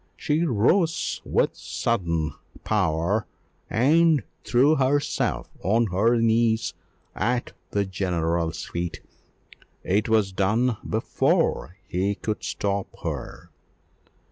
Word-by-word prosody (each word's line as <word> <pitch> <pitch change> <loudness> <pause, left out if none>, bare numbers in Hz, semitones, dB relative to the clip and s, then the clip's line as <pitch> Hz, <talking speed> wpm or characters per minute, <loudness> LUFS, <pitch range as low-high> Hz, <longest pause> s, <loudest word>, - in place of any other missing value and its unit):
She 155 +3 0
rose 160 - +1
with - - +1
sudden 85 - -1 0.3
power 95 +1 +1 0.4
and 155 +3 +4 0.2
threw 135 +5 +4
herself 140 +2 0
on 115 +6 +2
her 115 +6 +3
knees 115 0 +2 0.4
at 120 +2 -1 0.2
the 100 -1 0
general's 85 -3 -1
feet: 85 0 -4 0.8
it 105 +4 +1
was 110 -3 +3
done 110 +5 +1
before 90 - +1
he 95 +4 0
could 110 +1 -4
stop 100 -1 -2 0.2
her. - - -5
105 Hz, 95 wpm, -25 LUFS, 95-120 Hz, 0.8 s, and